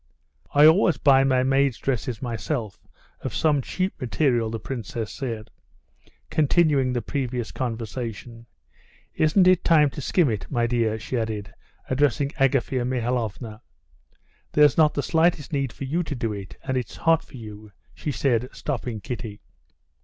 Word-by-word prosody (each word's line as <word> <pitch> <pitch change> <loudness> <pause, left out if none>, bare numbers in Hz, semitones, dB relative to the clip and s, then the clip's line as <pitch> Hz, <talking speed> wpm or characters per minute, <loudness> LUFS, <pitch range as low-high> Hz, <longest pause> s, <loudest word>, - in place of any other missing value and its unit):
"I 145 +1 +8
always 165 +2 +5
buy 135 -1 +5
my 130 -1 +2
maids' 135 -1 +2
dresses 125 -2 -3
myself, 115 -2 -4 0.3
of - - -5
some 150 -3 +2
cheap 185 +5 -3
material," 120 -3 +1
the 115 0 -4
princess 115 -3 -5
said, 115 -5 -5 0.8
continuing 150 -4 +3
the 120 -2 -2
previous 125 -4 -3
conversation. 115 -1 -5 0.7
"Isn't 170 +4 +3
it 185 -1 +4
time 150 -4 +4
to 145 - -7
skim 150 +1 +2
it, 105 -3 -4
my 120 -3 +1
dear?" 115 -2 0
she 120 +3 -3
added, 110 -2 -4 0.3
addressing 140 +1 +1
Agafea 135 -1 +2
Mihalovna. 120 -3 -2 0.9
"There's 150 -3 +5
not 155 -2 +4
the 145 - -1
slightest 160 -2 +1
need 135 -3 0
for - - -8
you 155 +6 -1
to 160 -4 -4
do 115 -3 -2
it, 100 -2 -8
and 130 -1 -1
it's 125 - -4
hot 165 -1 +3
for - - -13
you," 105 -2 -10 0.2
she 150 - -4
said, 125 -3 0
stopping 120 -6 -4
Kitty. 115 -2 -6
130 Hz, 150 wpm, -24 LUFS, 115-145 Hz, 0.9 s, I